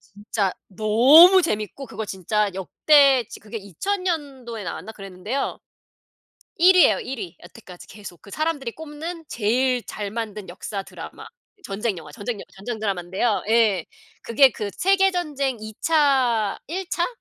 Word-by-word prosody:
진짜 205 -1 -3 0.2
너무 255 - +7
재밌고 215 - -3
그거 220 - -6
진짜 205 +2 -1
역대 270 - +4
지 - - -10
그게 215 +1 -8
2000 225 - -3
년도에 270 - -4
나왔나 200 +5 -6
그랬는데요 195 +6 -4 1.0
1 365 +2 +6
위예요 220 - +5
1 260 0 -6
위. 175 -6 -7
여태까지 180 0 -13
계속 200 -4 -11
그 200 - -15
사람들이 295 -3 -2
꼽는 320 +3 -8
제일 245 +3 +1
잘 205 -1 -5
만든 215 -2 -5
역사 195 +3 -6
드라마. - - -10 0.4
전쟁 205 -1 -2
영화 155 -3 -10
전쟁 205 +9 -4
영 - - -9
전쟁 220 +4 -5
드라마인데요. 195 +1 -1
예 220 -6 +3 0.4
그게 260 +3 +5
그 210 -3 -5
세계 385 0 +3
전쟁 290 -8 -2
2 220 0 -8
차 260 -9 +2
1 360 +4 -5
차? 345 - 0
230 Hz, 275 characters per minute, -23 LUFS, 205-290 Hz, 1.0 s, 너무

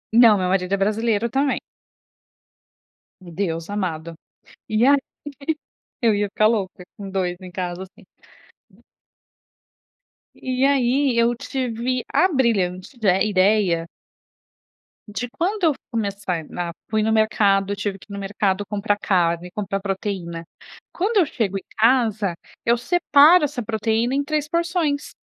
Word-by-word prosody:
Não, 230 -4 +7
meu 185 - 0
marido 180 0 0
é - - +3
brasileiro 215 +2 +1
também. 275 +3 0 1.6
Deus 170 -1 -4
amado! 170 -5 -3 0.6
E 215 +4 +2
aí 285 +1 +6 1.1
eu 225 -3 +3
ia 205 0 0
ficar 215 +2 +2
louca 195 -5 -2
com 200 -1 -7
2 185 -2 -1
em 185 -1 -9
casa, 180 0 -4
assim. 190 - -16 2.3
E 255 +1 -1
aí, 270 -1 +2
eu 235 +1 +3
tive 250 0 -2
a 370 - +5
brilhante 220 - 0
ide 195 -4 +2
ideia 185 -4 +2 1.2
de 225 +4 -4
quando 380 +3 -1
eu 310 - +4 0.2
começar, 200 -7 -2
na, 175 -1 -4 0.2
fui 220 -1 +1
no 220 - +1
mercado 200 -2 +2
tive 200 -1 -4
que - - -17
ir - - -6
no 200 - -5
mercado 200 0 -1
comprar 205 0 -1
carne, 175 -3 0
comprar 195 0 -3
proteína. 190 -4 -4 0.5
Quando 410 +5 0
eu 360 - +5
chego 220 -10 -2
em - - -9
casa, 220 -5 +2 0.3
eu 235 +1 +3
separo 315 +3 +5
essa 265 -3 -2
proteína 225 +3 0
em 285 - +1
3 300 0 -1
porções. 335 -3 -1
210 Hz, 135 wpm, -22 LUFS, 190-250 Hz, 2.3 s, Não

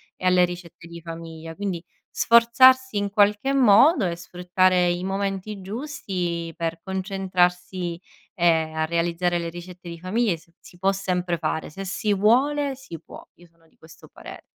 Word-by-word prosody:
e - - -8
alle 180 -1 +5
ricette 175 -1 -10
di 170 0 -10
famiglia. 165 -1 -9
Quindi, 185 -2 -4 0.3
sforzarsi 235 +1 +5
in 200 0 -1
qualche 210 +5 +2
modo 255 - +5
e 170 - -3
sfruttare 180 +1 +1
i 175 +1 -2
momenti 195 +1 -3
giusti 185 - -4
per 165 0 -3
concentrarsi 185 -2 -1 0.3
e 165 -4 +2
a 160 0 0
realizzare 170 +1 0
le 170 -1 -3
ricette 175 +1 -10
di 170 -1 -8
famiglia, 195 +1 0
si 170 +1 -23
si 175 - -17
può 190 +1 +2
sempre 180 -3 -2
fare. 160 0 -3
Se 195 +5 -8
si 205 +2 -1
vuole 270 +7 +2
si 255 - -10
può. - - -13
Io 175 - -19
sono 165 -1 -27
di - - -32
questo 160 0 -16
pare - - -11
180 Hz, 160 wpm, -24 LUFS, 170-205 Hz, 0.3 s, alle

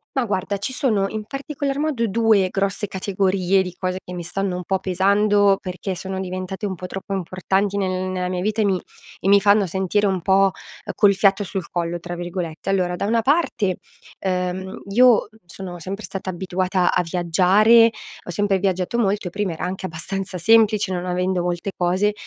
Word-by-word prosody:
Ma 265 - +1
guarda, 200 -1 -2
ci 205 +7 -4
sono 215 -7 +1
in 215 -1 -5
particolar 275 +1 -4
modo 290 -6 0
2 220 -2 +3
grosse 200 +1 -1
categorie 190 -1 +1
di 180 -1 -5
cose 185 0 -2
che 180 - -9
mi 175 -1 -5
stanno 185 +2 -2
un 180 - -4
po' 190 +2 -1
pesando, 200 +2 +3
perché 185 +1 -4
sono 190 +1 -5
diventate 185 +2 -4
un 195 - -2
po' 180 +1 -7
troppo 195 +1 -6
importanti 190 +2 -1
nel 185 -2 0
nella 180 -1 -2
mia 180 -1 -2
vita 215 +3 0
e - - +3
mi 190 -2 +1 0.4
e 190 - -3
mi 200 0 +7
fanno 200 -1 +4
sentire 190 +3 0
un 190 -3 -1
po', 195 +2 +4 0.4
col 205 -2 +5
"fiato 195 +1 +3
sul 185 -2 -5
collo" 175 0 -2
tra 175 +1 -6
virgolette. 175 -2 -5
Allora: 180 -2 0
da 175 - -3
una 230 +2 +2
parte, 250 - +1 0.4
ehm, 185 0 -3
io 235 +1 +4 0.2
sono 175 +1 -8
sempre 195 +5 -6
stata 190 -1 -5
abituata 185 0 0
a - - +3
viaggiare, 190 +7 +4 0.3
ho - - -12
sempre 200 +2 +1
viaggiato 185 +3 -1
molto, 200 -4 0
e - - -3
prima 200 +1 -2
era 160 - -4
anche 190 +1 -4
abbastanza 185 +2 -5
semplice, 215 0 +4
non 180 -1 -2
avendo 180 0 0
molte 175 +2 -2
cose, 185 +4 +1
190 Hz, 185 wpm, -22 LUFS, 180-205 Hz, 0.4 s, mi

